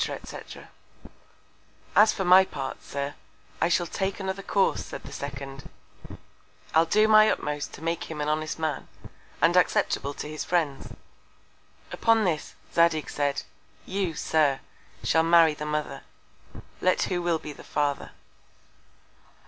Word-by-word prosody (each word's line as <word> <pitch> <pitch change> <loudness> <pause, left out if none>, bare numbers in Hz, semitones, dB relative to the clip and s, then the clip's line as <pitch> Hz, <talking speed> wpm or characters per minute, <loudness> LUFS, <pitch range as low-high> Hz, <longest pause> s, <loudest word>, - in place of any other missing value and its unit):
&c._ - - -6 1.3
As 215 +1 +7
for 190 - -3
my 185 +2 +8
Part, 135 -7 -6
Sir, 140 0 -4 0.5
I 165 - +3
shall 175 0 +2
take 190 +3 -3
another 190 0 -3
Course, 195 0 +1
said - - -8
the - - -10
second; 135 -1 -7 1.0
I'll 160 +1 +4
do 215 +5 +4
my 215 0 +7
utmost 150 -1 -2
to 155 - -10
make 165 0 -2
him 160 -2 -7
an 150 - -1
honest 155 +1 -1
Man, 155 -3 -3 0.6
and - - +5
acceptable 140 0 +1
to - - -6
his 155 0 -5
Friends. 160 -6 -1 1.0
Upon 225 -1 +3
this, 165 -6 -2 0.2
Zadig 170 -2 +2
said, 145 -1 -1 0.4
you, 190 -4 -2
Sir, 150 -4 +1 0.4
shall 160 - +3
marry 165 -1 +5
the 150 0 -6
Mother, 150 -2 -3 0.8
let 185 - +2
who 180 -2 -1
will 170 -1 +1
be 150 -1 -8
the - - -13
Father. 145 -1 -1
160 Hz, 140 wpm, -26 LUFS, 145-185 Hz, 1.3 s, my